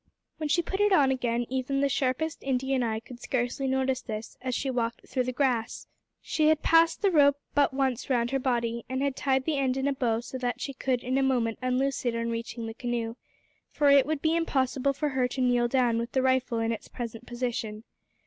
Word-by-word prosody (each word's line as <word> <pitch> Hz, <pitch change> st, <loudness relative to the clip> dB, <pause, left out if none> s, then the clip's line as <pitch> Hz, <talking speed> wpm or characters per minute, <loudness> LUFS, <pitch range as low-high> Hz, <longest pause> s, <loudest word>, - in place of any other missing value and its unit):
When 310 Hz, -1 st, -3 dB
she 345 Hz, +3 st, +2 dB
put 385 Hz, +3 st, -3 dB
it 415 Hz, 0 st, +3 dB
on 280 Hz, -8 st, +5 dB
again, 240 Hz, -2 st, 0 dB
even 265 Hz, +1 st, -1 dB
the 280 Hz, -, +3 dB
sharpest 275 Hz, +4 st, -1 dB
Indian 265 Hz, 0 st, 0 dB
eye 220 Hz, -2 st, -1 dB
could 240 Hz, +1 st, -12 dB
scarcely 255 Hz, +2 st, -1 dB
notice 265 Hz, -1 st, 0 dB
this 215 Hz, 0 st, -6 dB
as 255 Hz, -1 st, -2 dB
she 265 Hz, +1 st, -1 dB
walked 230 Hz, -2 st, -2 dB
through 255 Hz, -2 st, -1 dB
the 255 Hz, -, -1 dB
grass. 245 Hz, -3 st, -1 dB, 0.4 s
She 310 Hz, -1 st, +1 dB
had 315 Hz, -1 st, +3 dB
passed 330 Hz, +2 st, +4 dB
the 395 Hz, -, +4 dB
rope 285 Hz, -3 st, +5 dB, 0.2 s
but 285 Hz, -1 st, +3 dB
once 265 Hz, -2 st, -1 dB
round 240 Hz, -2 st, +1 dB
her 270 Hz, -, +1 dB
body, 235 Hz, -3 st, -1 dB
and 260 Hz, +1 st, -1 dB
had 280 Hz, -2 st, 0 dB
tied 265 Hz, -2 st, 0 dB
the 305 Hz, -3 st, 0 dB
end 265 Hz, -1 st, +1 dB
in 270 Hz, +1 st, 0 dB
a 280 Hz, -, +1 dB
bow 235 Hz, -4 st, 0 dB
so 260 Hz, +2 st, -7 dB
that 245 Hz, -1 st, -2 dB
she 275 Hz, -, -4 dB
could 260 Hz, -1 st, -1 dB
in 260 Hz, +2 st, 0 dB
a -, -, +2 dB
moment 245 Hz, -4 st, +1 dB
unloose 255 Hz, +2 st, 0 dB
it 240 Hz, -2 st, 0 dB
on 230 Hz, 0 st, -1 dB
reaching 230 Hz, 0 st, -4 dB
the 225 Hz, -, -5 dB
canoe, 235 Hz, -1 st, -3 dB, 0.5 s
for 290 Hz, -2 st, +3 dB
it 280 Hz, -1 st, +6 dB
would 310 Hz, -2 st, -2 dB
be 320 Hz, +1 st, +2 dB
impossible 275 Hz, -4 st, +1 dB
for 295 Hz, +2 st, -1 dB
her 260 Hz, -2 st, +1 dB
to 255 Hz, -, -6 dB
kneel 245 Hz, -1 st, +3 dB
down 240 Hz, -2 st, +2 dB
with 235 Hz, 0 st, -4 dB
the 260 Hz, -, +2 dB
rifle 260 Hz, -2 st, +1 dB
in 225 Hz, 0 st, 0 dB
its 225 Hz, -, -5 dB
present 235 Hz, -1 st, -7 dB
position. 235 Hz, -3 st, -3 dB
260 Hz, 225 wpm, -28 LUFS, 240-275 Hz, 0.5 s, it